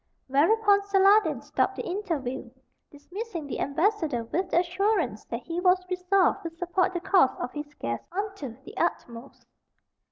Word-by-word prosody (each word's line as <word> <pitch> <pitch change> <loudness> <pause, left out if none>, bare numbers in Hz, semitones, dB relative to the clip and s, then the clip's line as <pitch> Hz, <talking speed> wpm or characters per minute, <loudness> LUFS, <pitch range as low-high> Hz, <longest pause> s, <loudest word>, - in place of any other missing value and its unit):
Whereupon 400 +9 +4
Saladin 400 +1 +4
stopped - - 0
the - - -5
interview, 300 - -3 0.4
dismissing 355 +4 -7
the 280 - -5
ambassador 315 - 0
with 360 +11 -2
the 345 - +4
assurance 360 - 0
that 235 +1 -5
he 340 +1 -4
was 365 0 +3
resolved 365 +1 +2
to 335 - -4
support 355 +2 -1
the - - 0
cause 365 -8 +4
of 245 - -4
his 295 0 -7
guest 115 0 -4
unto 380 - -5
the - - -12
utmost. 235 +3 -3
350 Hz, 150 wpm, -27 LUFS, 280-395 Hz, 0.4 s, Whereupon